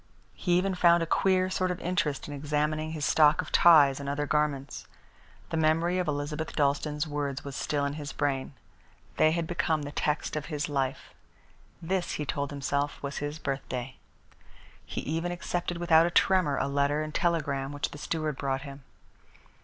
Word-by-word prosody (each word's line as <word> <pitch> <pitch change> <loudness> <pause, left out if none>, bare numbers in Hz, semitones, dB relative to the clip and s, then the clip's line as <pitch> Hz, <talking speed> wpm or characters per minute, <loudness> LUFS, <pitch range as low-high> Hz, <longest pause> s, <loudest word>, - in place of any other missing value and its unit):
He 175 - -1
even 190 +1 +1
found 170 -1 +4
a - - -1
queer 185 +2 +2
sort 185 0 0
of 180 0 -3
interest 165 -5 -1
in 145 - -6
examining 150 +2 -1
his 150 -3 -2
stock 150 -1 +5
of - - -3
ties 145 -6 +6
and 140 0 -4
other 145 +1 -1
garments. 145 -2 -1 0.6
The 165 - -1
memory 165 +3 +2
of 180 - -1
Elizabeth 150 +2 -3
Dalstan's 150 +1 0
words 145 -2 -3
was 140 -1 -6
still 145 0 -1
in 140 - -2
his 145 -2 -6
brain. 140 -2 -2 0.6
They 155 - +5
had 170 0 -1
become 160 -2 0
the 145 - -6
text 150 +2 -1
of 150 -1 -3
his 150 -2 -2
life. 135 -2 -2 0.7
This, 180 +1 -1
he 150 - -3
told 140 0 -2
himself, 140 0 -2
was 140 0 -4
his 145 +1 -3
birthday. 130 -3 -4 0.9
He - - -5
even 165 +4 -2
accepted 175 0 -3
without 170 -1 +5
a - - 0
tremor 175 -5 +3
a - - 0
letter 140 +2 +1
and 155 0 -6
telegram 145 -6 0
which 145 0 -3
the 145 - -9
steward 155 -2 -2
brought 135 -1 -2
him. 140 -1 -9
150 Hz, 175 wpm, -28 LUFS, 140-165 Hz, 0.9 s, ties